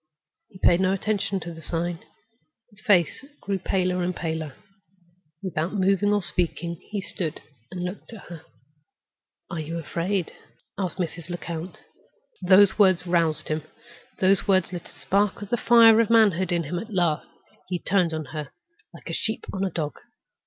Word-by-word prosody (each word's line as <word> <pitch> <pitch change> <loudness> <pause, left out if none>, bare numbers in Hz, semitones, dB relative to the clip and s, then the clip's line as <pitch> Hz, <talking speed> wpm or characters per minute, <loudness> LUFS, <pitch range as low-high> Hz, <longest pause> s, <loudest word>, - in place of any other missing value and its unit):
He 200 - -14
paid 175 -1 +4
no 190 0 +2
attention 200 0 -1
to 170 +1 -7
the 165 - -11
sign. 170 +2 -3 0.7
His 205 -1 -16
face 200 -2 +2 0.2
grew 195 -1 -2
paler 185 0 0
and 180 0 -1
paler. 160 -4 -4 0.9
Without 175 0 -2
moving 195 +1 +2
or 205 -2 +1
speaking 170 -1 +1
he 210 -2 -3
stood 170 -4 -4 0.3
and 180 -1 -5
looked 180 +5 -6
at 225 -4 -10
her. 170 -3 -10 1.1
"Are 170 - -3
you 160 +2 -4
afraid?" 170 +3 -2 0.4
asked 185 -2 -3
Mrs. 170 -1 -4
Lecount. 170 0 -6 0.6
Those 190 +3 +5
words 185 -3 +4
roused 165 -3 +1
him; 155 0 -1 0.6
those 190 0 +3
words 185 -2 +2
lit 175 -2 -6
a - - -15
spark 200 +1 0
of 200 - -9
the - - +4
fire 230 -1 +7
of 225 - 0
manhood 200 -6 +4
in 170 -1 +1
him 175 +4 -3
at 225 +4 -9
last. 175 -6 0 0.4
He 180 - -1
turned 180 -1 +1
on 155 -1 -4
her 150 -3 -5 0.5
like - - -13
a - - -4
sheep 220 0 -2
on 190 - -2
a 195 - 0
dog. 155 -4 -4
180 Hz, 165 wpm, -25 LUFS, 170-195 Hz, 1.1 s, fire